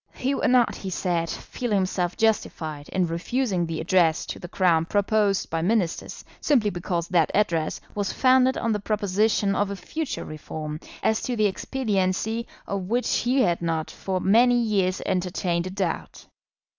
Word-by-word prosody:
He 265 Hz, +2 st, -1 dB
would -, -, +1 dB
not, 250 Hz, -1 st, +4 dB
he 195 Hz, -, -5 dB
said, 170 Hz, -2 st, -1 dB
feel 245 Hz, -, -5 dB
himself 185 Hz, -3 st, 0 dB
justified 160 Hz, -9 st, -1 dB
in 185 Hz, -1 st, +1 dB
refusing 180 Hz, +2 st, -1 dB
the 165 Hz, -1 st, -3 dB
Address 165 Hz, -1 st, +2 dB
to -, -, -6 dB
the 175 Hz, -, -7 dB
Crown 170 Hz, -3 st, +2 dB
proposed 205 Hz, +1 st, +1 dB
by 165 Hz, 0 st, 0 dB
Ministers, 180 Hz, -2 st, -1 dB
simply 235 Hz, -9 st, +2 dB
because 175 Hz, -1 st, -2 dB
that 170 Hz, -4 st, +3 dB
Address 170 Hz, -6 st, +1 dB
was 205 Hz, -2 st, -1 dB
founded 260 Hz, 0 st, +4 dB
on 230 Hz, -, 0 dB
the 210 Hz, -, 0 dB
proposition 205 Hz, 0 st, +1 dB
of 205 Hz, -1 st, +1 dB
a 200 Hz, -, -3 dB
future 310 Hz, -, -4 dB
reform, 155 Hz, 0 st, -6 dB, 0.2 s
as 220 Hz, -, +2 dB
to 250 Hz, -, -2 dB
the 215 Hz, -2 st, +2 dB
expediency 215 Hz, 0 st, -1 dB, 0.2 s
of 195 Hz, -2 st, -4 dB
which 245 Hz, +2 st, +1 dB
he 255 Hz, +2 st, +2 dB
had 175 Hz, -3 st, +1 dB
not 165 Hz, -2 st, -2 dB
for 190 Hz, -1 st, -3 dB
many 240 Hz, +6 st, +4 dB
years 195 Hz, -5 st, 0 dB
entertained 180 Hz, -1 st, -1 dB
a -, -, -4 dB
doubt. 185 Hz, -3 st, -4 dB
195 Hz, 165 wpm, -25 LUFS, 175-220 Hz, 0.2 s, not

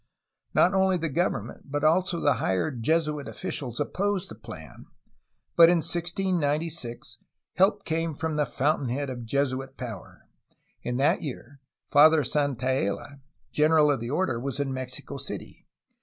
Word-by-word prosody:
Not 185 Hz, -, +5 dB
only 190 Hz, -1 st, +3 dB
the 165 Hz, -1 st, -2 dB
government 140 Hz, -, -2 dB
but 145 Hz, +1 st, -1 dB
also 170 Hz, +2 st, +2 dB
the 145 Hz, -, +2 dB
higher 95 Hz, +11 st, 0 dB
Jesuit 150 Hz, +3 st, 0 dB
officials 120 Hz, -4 st, -5 dB
opposed 195 Hz, +5 st, -1 dB
the -, -, -7 dB
plan, -, -, -11 dB, 0.7 s
but 165 Hz, -1 st, +8 dB
in 175 Hz, -, +4 dB
1696 165 Hz, -6 st, -2 dB, 0.4 s
help 200 Hz, +2 st, +3 dB
came 165 Hz, -1 st, -1 dB
from 160 Hz, +1 st, -2 dB
the 150 Hz, -2 st, +1 dB
fountain 140 Hz, +1 st, 0 dB
head 135 Hz, +2 st, -2 dB
of 120 Hz, -2 st, -6 dB
Jesuit 135 Hz, +1 st, -1 dB
power. 115 Hz, -6 st, -8 dB, 0.6 s
In 125 Hz, 0 st, -2 dB
that 150 Hz, +7 st, +2 dB
year 140 Hz, -1 st, -7 dB, 0.3 s
Father 155 Hz, +1 st, +7 dB
Santaella, 135 Hz, -1 st, -1 dB, 0.3 s
general 150 Hz, -1 st, +4 dB
of 140 Hz, -, 0 dB
the 115 Hz, +1 st, -5 dB
order, 145 Hz, -4 st, 0 dB
was 140 Hz, +3 st, -3 dB
in 140 Hz, -2 st, -1 dB
Mexico 130 Hz, -1 st, -6 dB
City. -, -, -7 dB
145 Hz, 140 wpm, -27 LUFS, 130-165 Hz, 0.7 s, but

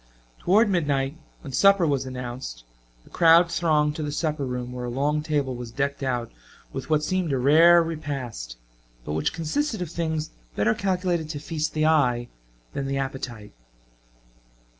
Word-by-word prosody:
Toward 210 Hz, +5 st, +4 dB
midnight, 145 Hz, -7 st, 0 dB, 0.3 s
when 140 Hz, -4 st, -9 dB
supper 195 Hz, +4 st, +5 dB
was 140 Hz, -3 st, 0 dB
announced, 125 Hz, -, -6 dB, 0.4 s
the -, -, -21 dB
crowd 170 Hz, 0 st, +5 dB
thronged 150 Hz, -3 st, +2 dB
to -, -, -3 dB
the 150 Hz, -1 st, -3 dB
supper 150 Hz, -1 st, -1 dB
room 125 Hz, -1 st, -4 dB
where 125 Hz, 0 st, -5 dB
a -, -, -3 dB
long 145 Hz, +5 st, 0 dB
table 145 Hz, -4 st, -1 dB
was 120 Hz, -1 st, -7 dB
decked 140 Hz, +4 st, -2 dB
out 125 Hz, -3 st, -2 dB, 0.4 s
with -, -, -6 dB
what 155 Hz, -1 st, +2 dB
seemed 180 Hz, 0 st, 0 dB
a 135 Hz, -, +1 dB
rare 165 Hz, +6 st, +6 dB
repast, 135 Hz, -, -5 dB, 0.5 s
but 75 Hz, -, -3 dB
which 80 Hz, 0 st, 0 dB
consisted 220 Hz, -, -2 dB
of 175 Hz, -3 st, -4 dB
things 160 Hz, -2 st, -2 dB, 0.2 s
better 110 Hz, +2 st, +2 dB
calculated 180 Hz, -4 st, -1 dB
to 150 Hz, -2 st, -4 dB
feast 155 Hz, +1 st, -3 dB
the 155 Hz, 0 st, +2 dB
eye 125 Hz, -6 st, +2 dB, 0.4 s
than 140 Hz, -1 st, -3 dB
the 135 Hz, 0 st, -1 dB
appetite. 130 Hz, -6 st, -5 dB
150 Hz, 160 wpm, -25 LUFS, 125-165 Hz, 0.5 s, rare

